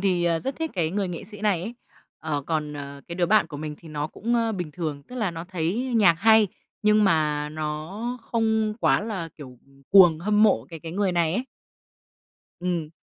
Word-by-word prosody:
thì 180 -3 +2 0.2
rất 270 - -2
thích 320 -1 -3
cái 165 -4 0
người 195 -1 -1
nghệ 170 - -6
sĩ 210 0 -12
này 205 -5 +1
ấy. 230 +5 -5 0.4
Ờ, 145 -2 -2
còn, 155 -2 -1
ờ, 140 -1 -7
cái 170 - -5
đứa 175 -1 +1
bạn 215 -2 +4
của 150 - -8
mình 150 0 -5
thì 165 - -13
nó 150 0 -3
cũng, 235 +8 -2
ơ, 230 -1 +1
bình 175 -6 -4
thường, 155 -5 -4
tức 250 - -11
là 215 -7 0
nó 165 0 -6
thấy 190 +8 -2
nhạc 185 -6 +6
hay, 220 +1 +5 0.3
nhưng 210 0 +4
mà 150 -4 +1
nó 155 +11 -4
không 220 -2 0
quá - - +3
là, 205 -6 -4
kiểu, 130 -4 -11 0.3
cuồng, 175 -5 +7
hâm 210 +4 +2
mộ 125 - +4
cái 165 -2 -9
cái 165 -1 -7
người 195 -1 +1
này 170 -1 +1
ấy. 250 - -1 1.2
Ừm. 170 -4 -2
175 Hz, 205 wpm, -25 LUFS, 155-215 Hz, 1.2 s, cuồng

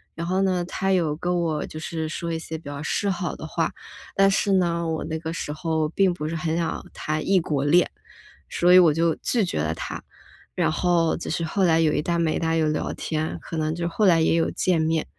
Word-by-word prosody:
然 170 - -4
后 185 +2 0
呢， 185 -2 +1
他 195 +2 -1
有 165 -5 +1
跟 175 +2 -1
我 155 -3 -1
就 155 - -8
是 160 0 -4
说 170 +1 -4
一 160 - -2
些 160 0 -6
比 165 - -15
较 145 0 -6
示 200 - -1
好 180 -3 -2
的 - - -8
话， 165 +1 -1 0.4
但 195 0 +5
是 200 - +1
呢， 170 -2 +1
我 160 -1 -2
那 160 0 -3
个 160 0 -5
时 150 -3 -4
候 160 -1 -1
并 190 +2 +2
不 165 -3 -4
是 165 - -3
很 160 0 -1
想 170 -1 -2
谈 155 0 -3
异 195 -1 +5
国 145 -4 -1
恋， 170 +5 +4 0.6
所 175 +1 +3
以 185 - +10
我 170 -3 +6
就 165 +1 +2
拒 225 -6 0
绝 125 - -3
了 80 +1 -1
他。 - - -6 0.5
然 80 - +1
后 170 - +2
就 - - -6
是 165 +1 -1
后 190 +4 0
来 165 -2 +4
有 160 -2 +3
一 - - +1
搭 170 +2 -1
没 165 -2 +1
一 - - -2
搭 165 -1 0
地 - - +2
有 155 -1 +2
聊 150 - -2
天， 155 0 -3
可 165 - -6
能 155 0 -1
就 170 0 -2
后 200 +5 +1
来 170 -3 +5
也 160 - +3
有 165 0 +2
见 175 -3 +1
面。 160 0 0
165 Hz, 270 characters per minute, -24 LUFS, 155-175 Hz, 0.6 s, 以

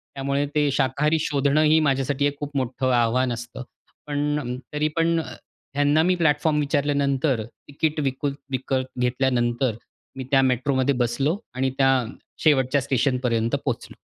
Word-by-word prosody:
त्यामुळे 140 +1 -1
ते 150 -1 +3
शाकाहारी 150 +5 +1
शोधणं 145 0 +1
ही 155 +1 +4
माझ्यासाठी 135 +1 0
एक 145 0 -2
खूप 145 -1 -6
मोठं 130 0 -1
आव्हान 120 +2 +2
असतं. 120 +2 -7 0.4
पण, 145 -3 -2 0.2
तरी 150 +1 +1
पण, 165 0 +2 0.6
ह्यांना 145 +2 +3
मी 180 +1 +2
प्लॅटफॉर्म 150 -2 +2
विचारल्यानंतर, 140 -3 0
तिकीट 150 +5 -4
विकू 135 +1 -1 0.2
विकत 130 0 -1
घेतल्यानंतर, 125 -1 0 0.4
मी 130 - -4
त्या 135 -1 +5
मेट्रोमध्ये 130 +1 +1
बसलो 135 - 0 0.2
आणि 130 +1 0
त्या 135 - +5 0.5
शेवटच्या 140 -2 +3
स्टेशनपर्यंत 125 -3 0
पोहोचलो. - - -3
135 Hz, 130 wpm, -23 LUFS, 130-145 Hz, 0.6 s, त्या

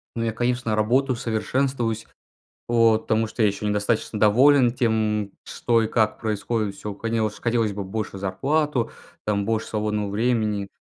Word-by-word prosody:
Ну 115 - -1
я, 115 - 0
конечно, 120 -1 0
работаю, 125 +5 +2
совершенствуюсь, 115 0 -1 0.6
вот, 115 -2 +3
потому 110 0 +1
что 115 - -4
я 110 - +5
еще 100 +1 -3
недостаточно 105 +1 0
доволен 125 +4 +5
тем, 110 -4 0
что 115 -1 +1
и 110 - 0
как 110 -2 +1
происходит. 110 -1 -2
Всё 105 0 -6
хотелось 110 -1 -2
хотелось 115 -3 0
бы 100 - -4
больше 100 +1 -4
зарплату, 125 +7 0 0.3
там 100 -1 0
больше 110 0 -1
свободного 105 -1 -2
времени. 105 -2 0
110 Hz, 150 wpm, -24 LUFS, 105-120 Hz, 0.6 s, я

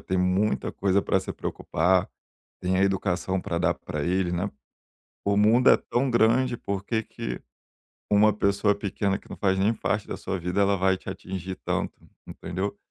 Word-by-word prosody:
tem 95 0 -2
muita 90 -3 +1
coisa 100 0 +2
pra - - +1
se - - -5
preocupar, 90 +3 0 0.5
tem 95 0 +1
a 95 - +3
educação 95 -1 0
para 85 - -2
dar 85 0 +2
pra 75 -2 -5
ele, 90 0 0
né. 90 +4 -1 0.8
O 100 0 +2
mundo 110 +5 +5
é - - +8
tão 130 +2 -1
grande, 120 +2 +3
por 100 -3 -4
que 110 -1 0
que - - -6 0.7
uma 105 +1 +6
pessoa 100 0 +2
pequena 100 0 -1
que - - -19
não - - -7
faz 95 -2 +1
nem 105 +4 +3
parte 105 -1 -2
da - - -4
sua 95 - -4
vida, 90 +4 0
ela 100 0 +3
vai 95 +1 +3
te - - -9
atingir 95 0 -5
tanto, - - -2 0.3
entendeu, 95 +3 -4
95 Hz, 180 wpm, -26 LUFS, 90-105 Hz, 0.8 s, é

